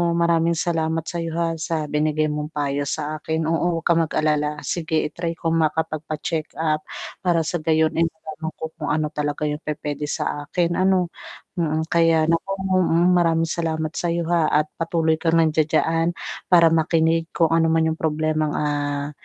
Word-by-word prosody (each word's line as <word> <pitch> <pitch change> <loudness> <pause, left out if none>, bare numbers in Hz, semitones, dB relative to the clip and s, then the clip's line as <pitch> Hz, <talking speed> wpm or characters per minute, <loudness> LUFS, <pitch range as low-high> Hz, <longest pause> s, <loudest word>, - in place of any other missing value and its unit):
maraming 170 0 +2
salamat 160 -1 0
sayo, 165 -1 -3
ha, 165 -1 0
sa 160 -1 -2
binigay 155 +1 +1
mong 150 0 -3
payo 145 -1 -1
sa 155 +1 -3
akin 160 0 -1
oo, 165 +1 +1
huwag 165 - -15
kang 170 -1 +4
mag-alala 150 -1 0
sige 160 -2 -1
i-try 170 +2 -4
ko 165 - -4
makapagpa-check-up 155 0 -1 0.4
para 170 -2 +3
sa 175 - -1
gayon 160 0 +3
eh 165 - +4
matanong 160 0 -6
ko 160 - -5
kung 155 -2 -4
ano 155 0 0
talaga 150 -1 -3
yung 150 0 -3
pupuwede 150 -1 -3
sa 145 0 -3
akin, 170 0 0
ano 185 -2 +2 0.5
mm. 160 -1 -1
Kaya 165 -1 +3
naku 165 +4 0 0.3
mm, 175 0 +3
maraming 165 -1 +2
salamat 160 -2 -1
sayo 170 -1 -1
ha, 170 -2 +3 0.2
at 155 - -9
patuloy 165 -1 +1
kang 165 -1 +3
nandiyan-diyan 160 +1 +1 0.3
para 170 -2 +6
makinig 165 0 +2
kung 165 -1 +2
ano 165 0 +3
man 160 0 +3
yung 160 - -3
problemang, 155 -1 0
ah, 145 -1 -1
160 Hz, 160 wpm, -22 LUFS, 155-165 Hz, 0.5 s, para